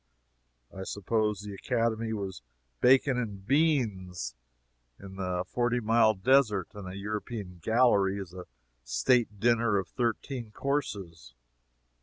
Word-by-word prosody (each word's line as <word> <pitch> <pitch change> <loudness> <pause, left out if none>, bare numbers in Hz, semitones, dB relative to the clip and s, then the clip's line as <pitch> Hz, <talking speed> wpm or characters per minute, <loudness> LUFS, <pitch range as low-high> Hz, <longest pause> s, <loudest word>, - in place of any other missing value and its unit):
I 95 - -6
suppose 105 +1 -1
the 105 -1 -7
Academy 115 +1 -1
was 100 - -4 0.4
bacon 130 - +4
and 100 -5 -5
beans 105 - +1 0.7
in 95 -1 -10
the 90 -1 -1
Forty 120 +2 0
Mile 110 -1 +4
Desert, 105 -3 +3
and 105 -3 -8
a 95 +1 -6
European 105 -2 -5
gallery 105 -2 +3
is 95 -3 -7
a 90 -1 -9 0.4
state 105 - +1
dinner 115 -1 +3
of 95 -2 -2
thirteen 120 0 -2
courses. 100 - -4
105 Hz, 120 wpm, -29 LUFS, 95-120 Hz, 0.7 s, bacon